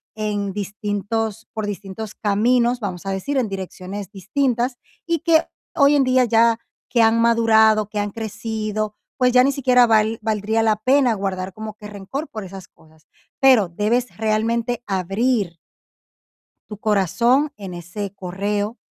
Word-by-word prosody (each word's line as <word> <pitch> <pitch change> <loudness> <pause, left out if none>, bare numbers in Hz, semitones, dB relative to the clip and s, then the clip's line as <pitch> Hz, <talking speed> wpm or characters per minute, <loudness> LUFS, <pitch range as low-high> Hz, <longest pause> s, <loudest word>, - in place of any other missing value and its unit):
en 205 -2 -2
distintos 210 +2 -3
por 220 -2 -3
distintos 205 +1 -6
caminos, 235 +4 +2
vamos 190 -3 -5
a 195 - -2
decir, 195 +9 -2
en 235 -5 0
direcciones 190 0 -6
distintas, 245 +4 -1 0.3
y 335 -2 0
que 325 0 +3 0.3
hoy 285 0 +5
en 275 - +4
día 255 0 +4
ya 230 0 +3 0.3
que 235 - +3
han 225 +1 +4
madurado, 220 -2 +4
que 210 -1 -3
han 205 0 -2
crecido, 215 -1 -4 0.2
pues, 250 -1 +3
ya 250 0 +6
ni 275 - +3
siquiera 250 -2 +4
val 220 0 +3
valdría 220 +1 0
la 215 -1 +2
pena 255 +1 +3
guardar 195 -2 -3
como 215 0 -7
que 210 -1 -10
rencor 210 +10 -6
por 215 -2 -6
esas 190 0 -10
cosas. 155 0 -24 0.4
Pero 255 -8 +6
debes 230 +7 -1
realmente 225 +2 0
abrir 195 0 0 1.1
tu 210 - -8
corazón 235 - +2
en 195 -3 -7
ese 180 +4 -6
correo. 205 +4 -3
215 Hz, 150 wpm, -21 LUFS, 200-235 Hz, 1.1 s, ya